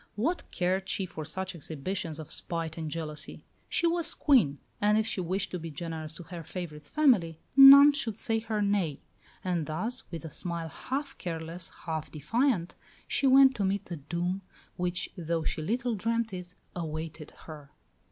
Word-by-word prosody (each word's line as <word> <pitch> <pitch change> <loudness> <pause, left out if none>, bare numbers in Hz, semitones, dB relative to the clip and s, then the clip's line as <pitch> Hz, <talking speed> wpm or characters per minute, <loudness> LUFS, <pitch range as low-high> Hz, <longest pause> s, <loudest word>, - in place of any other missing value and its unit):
What 320 +12 -1
cared 185 +1 -1
she 195 - 0
for 160 -3 -7
such 190 +4 -3
exhibitions 165 +1 -4
of 155 -2 -8
spite 165 -2 -3
and 160 -2 -4
jealousy? 155 -1 -5 0.2
She 345 - +1
was 335 -1 +1
Queen; 220 - +4 0.2
and 210 +1 +4
if 220 - +2
she 210 -4 -2
wished 185 +3 -1
to 180 - -3
be 165 0 -6
generous 160 0 -5
to 175 - -8
her 170 0 -8
favourite's 150 -3 -7
family, 205 - +3 0.2
none 280 +1 +11
should 235 -7 -1
say 225 0 0
her 220 -2 -1
nay. 195 -8 0 0.4
And 175 -4 -1
thus, 220 +11 -3
with 165 -1 -6
a 160 - -7
smile 170 -2 -3
half 275 - -4
careless, 165 0 -4 0.2
half 160 -2 -3
defiant, 185 - 0 0.3
she 275 - +1
went 265 0 +7
to 205 - 0
meet 195 +1 0
the 175 - -6
doom 175 +6 -2 0.3
which, 175 -1 -2
though 165 -1 -2
she 155 - -2
little 240 +8 0
dreamt 230 +1 -1
it, 180 0 -7 0.2
awaited 160 -2 -5 0.2
her. 150 -3 -10
180 Hz, 170 wpm, -29 LUFS, 160-220 Hz, 0.4 s, none